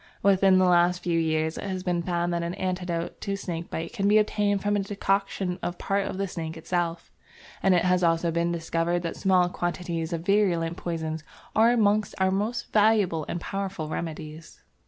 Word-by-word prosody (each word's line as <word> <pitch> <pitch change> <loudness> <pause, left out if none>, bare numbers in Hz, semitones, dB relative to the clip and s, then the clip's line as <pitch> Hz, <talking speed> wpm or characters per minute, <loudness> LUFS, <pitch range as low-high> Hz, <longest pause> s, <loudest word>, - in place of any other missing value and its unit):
Within 195 -1 +5
the 185 - +4
last 180 0 +3
few 170 -1 +1
years 160 0 0
it - - -6
has 185 -2 -3
been 175 -2 0
found 175 0 -1
that 170 - 0
an 170 +1 -3
antidote 180 -2 -3
to 200 - -2
snake 170 -4 -5
bite 165 +6 -5
can 200 -4 0
be 210 +1 +5
obtained 205 -2 +1
from 205 0 +1
a - - +2
decoction 195 -2 -1
of 175 - -3
part 195 0 -1
of - - -5
the 195 0 -1
snake 165 -2 -5
itself, 170 0 -2 0.5
and 190 -1 +4
it 175 - +2
has 180 0 +2
also 165 0 +2
been 170 +1 0
discovered 170 +1 -1
that 165 - -3
small 185 -2 +3
quantities 175 -2 -3
of 165 0 -3
virulent 175 -5 +2
poisons 160 -3 -4 0.3
are 225 +2 +6
amongst 215 -3 +2
our 190 0 +2
most 220 +5 -2
valuable 205 -7 +3
and 175 - -2
powerful 195 -5 -4
remedies. 155 -1 -6
180 Hz, 190 wpm, -26 LUFS, 170-195 Hz, 0.5 s, are